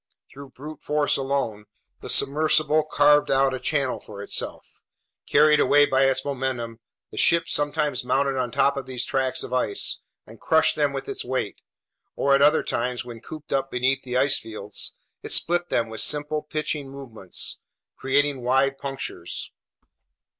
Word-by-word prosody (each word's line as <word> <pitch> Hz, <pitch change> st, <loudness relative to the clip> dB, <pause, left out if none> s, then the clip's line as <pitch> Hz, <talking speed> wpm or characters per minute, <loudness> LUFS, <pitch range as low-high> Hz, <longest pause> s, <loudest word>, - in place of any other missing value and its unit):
Through 140 Hz, 0 st, -11 dB
brute 150 Hz, +3 st, -9 dB
force 150 Hz, 0 st, +1 dB
alone, 135 Hz, -6 st, -2 dB, 0.3 s
the -, -, -9 dB
submersible 155 Hz, +1 st, +3 dB
carved 150 Hz, -1 st, +4 dB
out 135 Hz, 0 st, +3 dB
a 130 Hz, -, -3 dB
channel 135 Hz, 0 st, 0 dB
for 100 Hz, -1 st, -10 dB
itself. -, -, -5 dB, 0.5 s
Carried 150 Hz, +1 st, +5 dB
away 145 Hz, 0 st, +5 dB
by 135 Hz, -1 st, +3 dB
its 135 Hz, 0 st, +1 dB
momentum, 130 Hz, -4 st, -3 dB, 0.3 s
the -, -, -10 dB
ship 165 Hz, 0 st, +4 dB
sometimes 145 Hz, -3 st, 0 dB
mounted 135 Hz, +2 st, +1 dB
on 130 Hz, -2 st, -1 dB
top 140 Hz, +2 st, +2 dB
of 135 Hz, -, -5 dB
these 125 Hz, -1 st, -2 dB
tracts 130 Hz, -1 st, 0 dB
of 125 Hz, -, -7 dB
ice 390 Hz, -, 0 dB, 0.2 s
and -, -, -15 dB
crushed -, -, +3 dB
them -, -, +1 dB
with -, -, -5 dB
its 410 Hz, +1 st, -3 dB
weight, -, -, -3 dB, 0.5 s
or 140 Hz, -, +2 dB
at 140 Hz, -, +4 dB
other 150 Hz, +2 st, +5 dB
times, 125 Hz, +1 st, -2 dB
when 115 Hz, -2 st, -9 dB
cooped 155 Hz, -1 st, -8 dB
up 135 Hz, 0 st, 0 dB
beneath 130 Hz, +2 st, +1 dB
the 125 Hz, -1 st, -3 dB
ice 135 Hz, +1 st, +3 dB
fields, 105 Hz, -2 st, -4 dB, 0.3 s
it -, -, -7 dB
split 175 Hz, +1 st, +1 dB
them 115 Hz, -1 st, +1 dB
with 110 Hz, -1 st, -6 dB
simple 150 Hz, +1 st, 0 dB
pitching 150 Hz, -2 st, -3 dB
movements, 120 Hz, -9 st, -5 dB, 0.4 s
creating 140 Hz, 0 st, +1 dB
wide 135 Hz, +2 st, +1 dB
punctures. 135 Hz, -1 st, -5 dB
135 Hz, 160 wpm, -24 LUFS, 125-145 Hz, 0.5 s, Carried